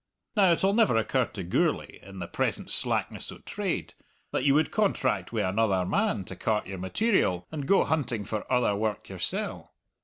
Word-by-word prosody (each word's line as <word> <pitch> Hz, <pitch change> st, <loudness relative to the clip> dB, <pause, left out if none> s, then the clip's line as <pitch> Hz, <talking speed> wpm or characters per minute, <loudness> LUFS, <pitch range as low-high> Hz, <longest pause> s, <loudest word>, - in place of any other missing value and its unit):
Now, 195 Hz, -4 st, +5 dB
it'll 195 Hz, +4 st, +2 dB
never 220 Hz, -, +4 dB
occur 125 Hz, +3 st, +1 dB
to 100 Hz, -4 st, -7 dB
Gourlay, 85 Hz, -, 0 dB
in 100 Hz, -1 st, -12 dB
the 90 Hz, -, -4 dB
present -, -, -1 dB
slackness -, -, 0 dB
o' -, -, -10 dB
trade, -, -, -3 dB, 0.4 s
that -, -, -1 dB
you 140 Hz, 0 st, +4 dB
would 155 Hz, +1 st, +2 dB
contract 130 Hz, -, 0 dB
wi' 115 Hz, -2 st, 0 dB
another 95 Hz, -2 st, +1 dB
man 200 Hz, -, 0 dB
to 95 Hz, -, -7 dB
cart 105 Hz, +3 st, 0 dB
your 95 Hz, -1 st, -6 dB
material, 95 Hz, -, +1 dB
and 145 Hz, -3 st, -4 dB
go 195 Hz, -, +5 dB
hunting 125 Hz, -9 st, -1 dB
for 105 Hz, +3 st, -5 dB
other 125 Hz, -5 st, +3 dB
work 105 Hz, 0 st, -2 dB
yoursell. -, -, -3 dB
115 Hz, 180 wpm, -28 LUFS, 95-160 Hz, 0.4 s, Now